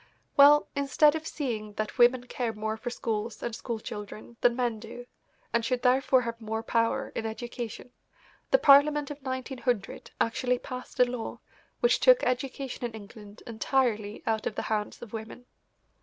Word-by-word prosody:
Well, 290 +1 +7
instead 280 +2 +4
of 320 0 -4
seeing 220 -8 -4
that 215 +3 -4
women 245 +1 +5
care 245 -2 -3
more 215 0 -3
for 240 +2 -5
schools 225 -2 -3
and 235 -2 -3
school 230 -1 -4
children 210 +2 -8
than 240 -1 +4
men 240 -3 -1
do 235 +2 -9 0.5
and 235 0 +2
should 245 +1 -1
therefore 260 +1 +4
have 230 0 -5
more 220 0 -3
power 230 0 0
in 225 - -3
education, 240 +1 -6 0.6
the - - +6
Parliament 295 - +5
of 290 0 -8
1900 260 -4 -3
actually 250 +2 +1
passed 255 +1 -8
a 250 - +7
law 245 -2 -5 0.4
which 485 - +4
took - - +6
education 255 0 -2
in 235 -2 -3
England 210 0 -12
entirely 225 -2 -1
out 220 -1 0
of 215 - -4
the - - -3
hands 210 +2 -3
of 235 - -11
women. 225 +2 -7
240 Hz, 165 wpm, -28 LUFS, 220-260 Hz, 0.6 s, Well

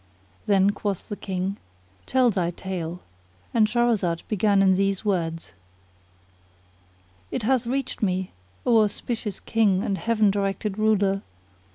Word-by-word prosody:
Then 195 0 +4
quoth 205 -2 -4
the 205 - -3
King, 190 0 -3 0.5
"Tell 255 -2 +3
thy 180 -4 0
tale;" 175 -1 -5 0.5
and 220 -2 +4
Shahrazad 215 -7 +1
began 205 -1 +3
in 190 -1 +5
these 195 +2 0
words: 165 -5 -1 1.8
It - - -3
hath 250 +1 +1
reached 265 0 -2
me, 185 -2 0 0.3
O 230 -3 +5
auspicious 215 0 -2
King 205 -4 +2
and 195 -1 -1
Heaven 215 -3 +2
directed 200 +1 -2
Ruler! 200 -2 +2
200 Hz, 125 wpm, -25 LUFS, 190-220 Hz, 1.8 s, in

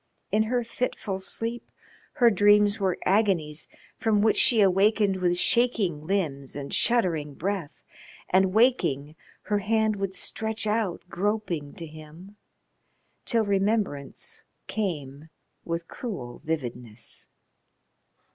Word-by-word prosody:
In 215 - +3
her 245 0 +1
fitful 230 -4 -3
sleep 230 +5 -4 0.4
her 240 -2 +5
dreams 205 +1 +4
were 190 -3 +1
agonies 185 -7 +1 0.3
from 210 -2 +2
which 220 - +4
she 235 - +5
awakened 200 +1 +4
with 175 -1 +1
shaking 195 -9 +1
limbs 150 -9 -1
and 140 -1 -5
shuddering 165 - +1
breath, 185 -3 -4 0.4
and 190 0 +3
waking, 170 - +2 0.3
her 205 -1 0
hand 220 +1 +1
would 195 -1 -3
stretch 220 0 -3
out 210 -5 0
groping 180 -6 -2
to 170 - -7
him 155 +5 -12 0.9
till 230 -3 +2
remembrance 200 -8 -1 0.2
came 155 -8 -4 0.4
with 170 0 -3
cruel 150 - -6
vividness. 125 -7 -4
195 Hz, 110 wpm, -26 LUFS, 155-215 Hz, 0.9 s, her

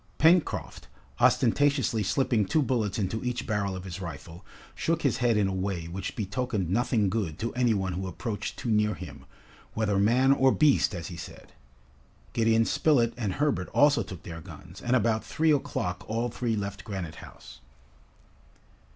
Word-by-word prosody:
Pencroft, 165 +2 +2 0.3
ostentatiously 130 -1 +3
slipping 115 +1 +1
two 155 +9 +2
bullets 115 -7 -1
into 110 +1 -2
each 125 -1 -2
barrel 100 -4 -1
of 95 - -6
his 95 0 -7
rifle, 85 0 -8 0.3
shook 165 0 -1
his 135 -5 +2
head 120 -3 +2
in 100 -2 +2
a 95 - -2
way 95 -3 -2
which 95 +3 -5
betokened 105 -3 -2
nothing 115 -1 +2
good 95 -6 -2
to 115 - -3
any 125 -3 +2
one 95 -2 -2
who 95 +2 -4
approached 105 +4 -5
too 120 - -3
near 105 -1 +2
him, - - -10 0.5
whether 105 -3 +1
"man 125 +6 +4
or 135 -1 +4
beast," 145 -9 +3
as 85 - -6
he 85 - -8
said. - - -10 0.8
Gideon 115 0 +3
Spilett 120 -6 +2
and 105 -6 -2
Herbert 145 +3 0
also 145 0 +5
took 90 -4 -8
their 85 -1 -8
guns, 90 +4 -12
and 125 +1 +1
about 110 -2 +1
three 160 0 +1
o'clock 105 -8 -1
all 115 +3 -1
three 115 -1 -2
left 100 -1 -4
Granite 95 -6 -6
House. - - -13
110 Hz, 170 wpm, -28 LUFS, 95-125 Hz, 0.8 s, also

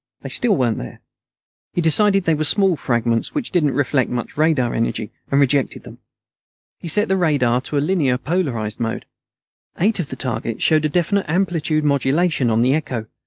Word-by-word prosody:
They - - -6
still 235 -5 +3
weren't 120 -7 0
there. - - -9 0.7
He - - -2
decided 195 +4 +4
they 165 - +2
were 155 0 -1
small 190 +4 +3
fragments 120 - -1
which 285 -5 -2
didn't 150 -7 +1
reflect 130 -2 +1
much 120 -1 -4
radar 150 -6 +1
energy, 115 -1 -2 0.2
and 140 - +2
rejected 140 -1 +1
them. - - -13 0.8
He - - -8
set 210 +7 +2
the 190 - +1
radar 135 -8 +1
to 145 +2 -4
a - - +2
linearly 145 -6 0
polarized 130 - -2
mode. 115 -1 -3 0.7
Eight 205 +3 +1
of 160 - -3
the - - -5
targets 115 -3 -3
showed 155 -1 +3
a - - +1
definite 180 +5 0
amplitude 165 -3 0
modulation 140 0 +1
on 110 0 +2
the 130 +3 +3
echo. 130 -7 -3
145 Hz, 180 wpm, -20 LUFS, 125-175 Hz, 0.8 s, decided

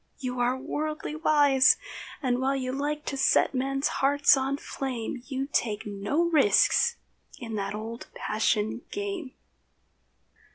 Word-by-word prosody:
You 250 -3 -4
are 245 +1 +1
worldly 305 +3 -4
wise, 285 -4 +4 0.5
And 250 -1 +1
while 270 +1 +1
you 255 -1 -2
like 295 +3 -3
to - - -3
set 270 - +3
men's 275 +2 0
hearts 285 +1 +4
on 270 +1 -1
flame, 255 -4 -5
You 270 -1 -3
take 215 -3 0
no 205 +10 -1
risks 380 +8 +4 0.4
in 230 -3 -7
that 195 0 -3
old 225 +2 -7
passion 215 +1 0
game. 395 -9 -5
270 Hz, 130 wpm, -27 LUFS, 245-290 Hz, 0.5 s, wise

